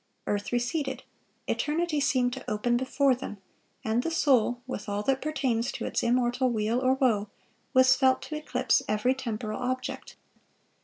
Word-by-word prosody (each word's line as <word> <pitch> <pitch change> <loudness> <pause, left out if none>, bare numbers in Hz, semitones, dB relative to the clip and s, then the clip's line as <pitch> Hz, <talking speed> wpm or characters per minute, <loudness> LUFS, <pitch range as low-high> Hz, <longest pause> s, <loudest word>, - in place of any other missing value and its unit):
Earth 205 0 -2
receded, 250 +4 -1 0.4
eternity 310 0 0
seemed 250 -3 +2
to 265 - -7
open 240 +3 +1
before 260 +2 +2
them, 245 -4 -6 0.5
and 225 +2 +1
the 330 - -2
soul, 255 -7 +2
with 255 -5 -5
all 205 0 -2
that 270 +3 +1
pertains 265 -5 0
to - - -5
its - - -1
immortal 245 +1 +2
weal 225 +1 0
or 260 0 +3
woe, 220 -6 +1 0.5
was 260 0 +6
felt 260 -1 +3
to 310 - -6
eclipse 280 -4 +1
every 215 +5 +2
temporal 230 -3 -4
object. 255 +1 -4
255 Hz, 155 wpm, -28 LUFS, 230-265 Hz, 0.5 s, was